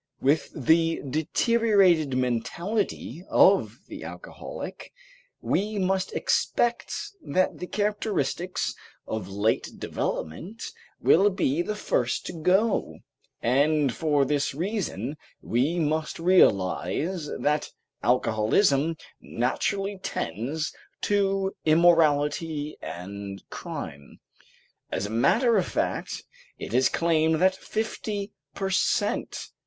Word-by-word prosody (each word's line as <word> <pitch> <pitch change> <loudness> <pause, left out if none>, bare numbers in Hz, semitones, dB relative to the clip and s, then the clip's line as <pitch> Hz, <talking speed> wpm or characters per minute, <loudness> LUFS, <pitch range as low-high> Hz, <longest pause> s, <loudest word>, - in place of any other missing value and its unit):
With 145 +4 +2
the 165 +3 +3
deteriorated 175 - +3
mentality 170 - -2
of - - +4
the - - -9
alcoholic, - - -8 0.5
we 210 +2 0
must 190 0 0
expect 240 0 +1 0.3
that 185 -9 0
the 180 - -5
characteristics 205 -3 -1 0.3
of 110 -4 -4
late 100 +3 0
development 175 - -4 0.4
will 195 +5 +5
be 175 -6 0
the 210 +4 -3
first - - -1
to - - -5
go, 185 +7 +1 0.5
and 140 +2 +3
for 150 -4 +2
this 140 -1 0
reason 180 -4 -3 0.2
we 135 +9 0
must 155 -1 -1
realize 160 - +2
that 150 0 0 0.3
alcoholism 125 - +2 0.3
naturally 195 - -1
tends 135 - -3 0.3
to 195 -1 +1
immorality 155 -2 +3
and 95 +2 -7
crime. 70 0 -7 0.7
As 95 - -1
a 105 - -5
matter 220 - +3
of 185 - +1
fact, - - -2 0.3
it - - -7
is 130 +2 +4
claimed 160 -1 +2
that 185 +4 +3
fifty 215 -1 -3 0.2
per 195 -1 -2
cent. - - 0
160 Hz, 100 wpm, -26 LUFS, 135-195 Hz, 0.7 s, will